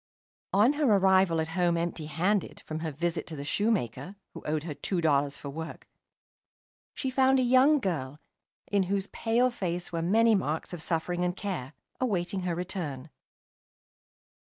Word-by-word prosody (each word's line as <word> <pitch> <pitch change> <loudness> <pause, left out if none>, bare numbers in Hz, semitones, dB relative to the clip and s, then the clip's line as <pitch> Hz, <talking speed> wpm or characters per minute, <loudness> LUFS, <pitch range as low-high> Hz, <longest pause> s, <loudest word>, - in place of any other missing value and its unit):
On 215 +8 +4
her 295 0 0
arrival 190 -3 +4
at 160 0 -1
home 175 0 +1
empty 165 -2 -3
handed, 185 +5 0
from 155 0 -5
her 160 -1 -3
visit 170 +3 -2
to 160 - -6
the 140 -1 -6
shoemaker, 185 - -1 0.2
who - - -8
owed 150 0 -1
her 160 -2 -4
two 180 +5 -2
dollars 145 -3 +2
for 140 - -7
work, 160 +3 -7 1.1
she 265 - -2
found 265 0 +4
a 260 - +3
young 260 +5 +5
girl, 150 - -3 0.5
in 200 -1 +1
whose 195 -1 0
pale 235 +4 +1
face 180 -5 -3
were 165 -1 -2
many 225 +6 +4
marks 160 -4 -1
of 175 - -5
suffering 175 +2 -1
and 180 0 0
care, 175 -10 -4 0.3
awaiting 195 -5 -1
her 180 -2 -2
return. 165 -6 -5
175 Hz, 160 wpm, -29 LUFS, 160-205 Hz, 1.1 s, young